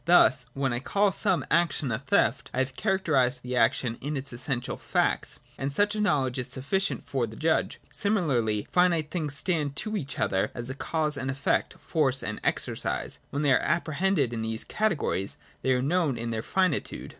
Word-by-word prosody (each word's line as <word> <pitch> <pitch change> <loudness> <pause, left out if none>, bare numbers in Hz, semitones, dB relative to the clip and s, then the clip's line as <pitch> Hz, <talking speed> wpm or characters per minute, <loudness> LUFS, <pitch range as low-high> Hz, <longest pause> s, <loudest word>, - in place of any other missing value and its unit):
Thus, 140 -7 +5
when 135 -2 0
I 120 - -1
call 200 +9 +2
some 190 -2 0
action 160 -5 +2
a 110 - -1
theft, 135 +1 +1
I - - -4
have 130 0 0
characterised 145 - +1
the 125 0 -3
action 115 0 +2
in 145 +2 -2
its 135 -1 -6
essential 125 0 -2
facts: - - 0 0.2
and 135 +1 -1
such 205 +8 +2
a 215 - -1
knowledge 135 -10 +1
is 125 - -1
sufficient 140 +10 -1
for 130 -4 -1
the 110 - -10
judge. 160 +4 0
Similarly, 135 - +1
finite 170 -4 +3
things 155 -5 -2
stand 150 -4 -1
to 215 +9 -2
each 140 -9 -3
other 95 0 +1
as 120 +2 -4
cause 155 -3 0
and 135 0 -3
effect, 135 +1 0
force 135 -5 0
and 110 - -4
exercise, - - -1
and - - -36
when 140 - -2
they 145 - +4
are - - +4
apprehended 160 -5 +1
in 115 - -3
these 110 0 -2
categories, 175 - 0 0.2
they 130 - +1
are 125 0 +2
known 155 -3 +1
in 115 0 -3
their 110 -1 -2
finitude. 185 +3 -1
140 Hz, 190 wpm, -27 LUFS, 125-170 Hz, 0.2 s, Thus